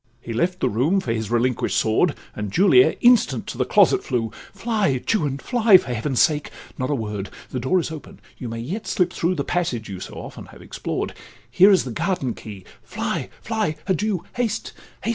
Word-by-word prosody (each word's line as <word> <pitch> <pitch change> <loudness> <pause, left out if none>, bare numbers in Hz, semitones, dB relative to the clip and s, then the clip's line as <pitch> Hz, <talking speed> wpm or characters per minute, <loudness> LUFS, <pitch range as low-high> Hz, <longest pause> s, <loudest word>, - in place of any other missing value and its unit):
He 120 - -7
left 180 +10 -1
the - - +3
room 140 - +2
for 120 -11 -2
his 110 -2 -3
relinquish'd 120 +1 0
sword, 115 +8 +2 0.2
And 105 -2 -4
Julia 160 - +5
instant 225 - +4
to - - -7
the - - +2
closet - - +4
flew. 115 -4 -1 0.2
'Fly, 200 - 0
Juan, 150 -11 +1
fly! 225 - +5
for 125 - -4
heaven's 120 +3 -1
sake—not 145 -3 -1
a 145 - +1
word— 105 -4 -4 0.2
The 130 - -2
door 130 +10 +2
is 165 - -3
open—you 140 -4 -10
may 115 - -5
yet 170 - -5
slip 180 -1 +1
through 175 +2 0
The 140 - -1
passage 140 -11 -2
you 95 -2 -6
so - - -8
often - - -9
have - - -15
explored— - - -4 0.4
Here 185 +8 +7
is 195 -2 +5
the 125 - -6
garden 135 - -1
key—Fly—fly—Adieu! 190 - -4
Haste—haste! 225 -3 -2
145 Hz, 175 wpm, -22 LUFS, 115-190 Hz, 0.4 s, Here